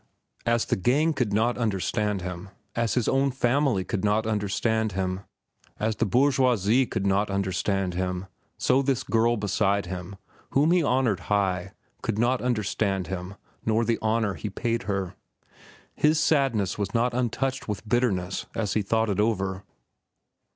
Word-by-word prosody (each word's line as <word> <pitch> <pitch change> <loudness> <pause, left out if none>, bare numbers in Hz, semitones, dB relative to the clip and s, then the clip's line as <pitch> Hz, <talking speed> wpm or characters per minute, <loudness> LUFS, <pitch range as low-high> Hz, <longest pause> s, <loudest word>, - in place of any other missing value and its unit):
As 115 -1 +2
the - - +1
gang 145 - +2
could 125 -7 -1
not 115 +4 +1
understand 105 -2 -1
him, 90 +1 -6 0.3
as 115 -1 0
his 125 -3 +1
own 135 +1 +2
family 125 -4 +1
could 95 +2 -3
not 105 +2 +2
understand 110 +1 0
him, 95 0 -1 0.6
as 110 0 -1
the - - +1
bourgeoisie 125 -1 +3
could 95 - -2
not 100 +2 +2
understand 95 -1 -1
him, 90 +1 -2 0.3
so 135 - +3
this 130 -2 0
girl 115 +1 +2
beside 100 -1 +1
him, 90 +2 -6 0.4
whom 145 +4 +4
he 180 0 +4
honored 125 - +1
high, 95 -2 0 0.3
could 110 -2 -2
not 120 +3 +2
understand 105 -5 0
him 90 +2 -5 0.3
nor 110 +1 +1
the 115 0 0
honor 110 -2 +1
he 105 +4 -5
paid 115 +3 -1
her. 95 -2 -1 0.8
His 155 +1 +3
sadness 135 - +1
was 100 +1 -2
not 120 +1 +2
untouched 130 +2 -1
with 105 0 -4
bitterness 100 -6 0
as 105 -4 -1
he 110 - +2
thought 110 +3 +1
it 100 - -1
over. 95 -3 0
110 Hz, 155 wpm, -26 LUFS, 95-120 Hz, 0.8 s, whom